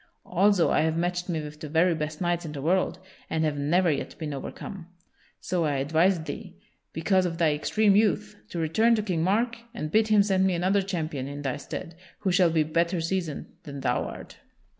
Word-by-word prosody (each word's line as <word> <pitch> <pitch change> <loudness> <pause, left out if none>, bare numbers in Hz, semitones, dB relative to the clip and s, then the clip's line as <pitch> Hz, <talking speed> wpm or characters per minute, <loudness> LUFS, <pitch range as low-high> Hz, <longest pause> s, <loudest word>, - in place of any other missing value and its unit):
Also 190 0 +3
I - - +3
have 160 +1 +1
matched 175 +1 -1
me 165 -2 0
with 150 0 -9
the 155 - -7
very 170 +3 +3
best 155 0 -4
knights 175 -1 0
in 155 -3 -6
the 140 - -5
world, 185 +3 +1 0.3
and 160 0 0
have 155 -2 0
never 165 +5 +2
yet 145 - -4
been 155 -3 -4
overcome. 170 +6 -7 0.5
So 175 -2 -1
I 150 -2 +1
advise 160 +6 +2
thee, 150 - -7 0.4
because 185 +3 +2
of 165 -1 -5
thy 160 -3 +3
extreme 200 +7 +2
youth, 200 - +2
to - - -6
return 220 +9 +3
to 215 - -1
King 180 -6 -1
Mark 230 +6 +1 0.2
and 155 -7 -4
bid 220 +3 +3
him 210 -2 +5
send 190 -1 +2
me 185 - +1
another 190 +4 +2
champion 160 -8 -3
in 145 +1 -6
thy 135 -3 -1
stead, 155 +3 -7 0.3
who 195 -3 +1
shall 180 -1 +4
be 160 -1 +2
better 170 +3 0
seasoned 165 -2 -3
than 140 -1 -8
thou - - 0
art." - - -9
170 Hz, 205 wpm, -27 LUFS, 155-190 Hz, 0.5 s, him